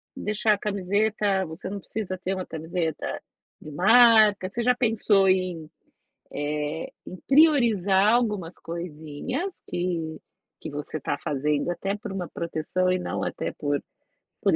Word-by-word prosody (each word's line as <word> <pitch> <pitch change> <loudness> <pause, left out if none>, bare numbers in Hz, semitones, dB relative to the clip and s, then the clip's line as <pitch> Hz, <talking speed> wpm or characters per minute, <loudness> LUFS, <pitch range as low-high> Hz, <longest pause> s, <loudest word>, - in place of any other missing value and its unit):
deixar 210 +1 +1
a - - -1
camiseta 200 0 0
você 165 +3 -7
não 200 +1 -4
precisa 190 -2 -5
ter 185 +1 -3
uma 185 - -4
camiseta 160 0 -3 0.4
de 155 - -9
marca". 215 +2 +6
Você 235 +4 -3
já 250 +1 +4
pensou 220 -5 +3
em, 180 -4 0 0.6
eh, 150 +2 -3 0.2
em 185 - -7
priorizar 225 - +5
algumas 210 -8 0
coisinhas 165 - -5 0.2
que 170 -3 -3 0.4
que - - -6
você 150 +2 -5
tá 145 - -2
fazendo 145 +2 -1
até 195 +3 -2
por 210 -1 -7
uma 185 -3 -4
proteção 170 +3 -1
e 185 - +1
não - - -3
até - - -3
por 145 -2 -1 0.6
por - - +3
185 Hz, 140 wpm, -25 LUFS, 160-210 Hz, 0.6 s, marca